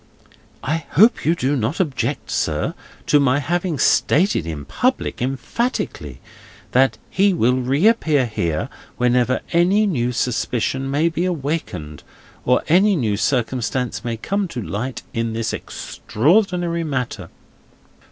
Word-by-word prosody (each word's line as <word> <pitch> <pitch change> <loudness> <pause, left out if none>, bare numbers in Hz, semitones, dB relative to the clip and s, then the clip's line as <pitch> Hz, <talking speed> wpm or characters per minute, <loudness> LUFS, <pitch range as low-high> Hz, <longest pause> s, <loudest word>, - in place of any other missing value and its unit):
"I 155 +3 -2
hope 220 +8 +4
you 165 - +4
do 140 -2 0
not 130 - -1
object, 155 -8 -2
sir, - - -1 0.3
to 150 - +4
my 140 -1 +3
having 170 +3 -1
stated 155 - +2
in 75 -3 -5
public, 255 - -1
emphatically, 130 - -3 0.5
that 130 +1 +3
he 195 -1 +3
will 125 -3 +2
reappear 145 - +2
here, 85 -8 -2 0.3
whenever 125 0 +2
any 185 +5 +4
new 125 - 0
suspicion 125 +2 -1
may 145 +4 +2
be 170 +1 -1
awakened, 140 - -3 0.4
or 125 0 +3
any 190 +5 +4
new 110 - 0
circumstance 125 0 -1
may 115 -2 -3
come 200 - -1
to 125 -8 -5
light 120 +7 -4
in 115 -1 -1
this 115 0 -2
extraordinary 175 - 0
matter?" 125 - -3
135 Hz, 125 wpm, -20 LUFS, 120-170 Hz, 0.5 s, hope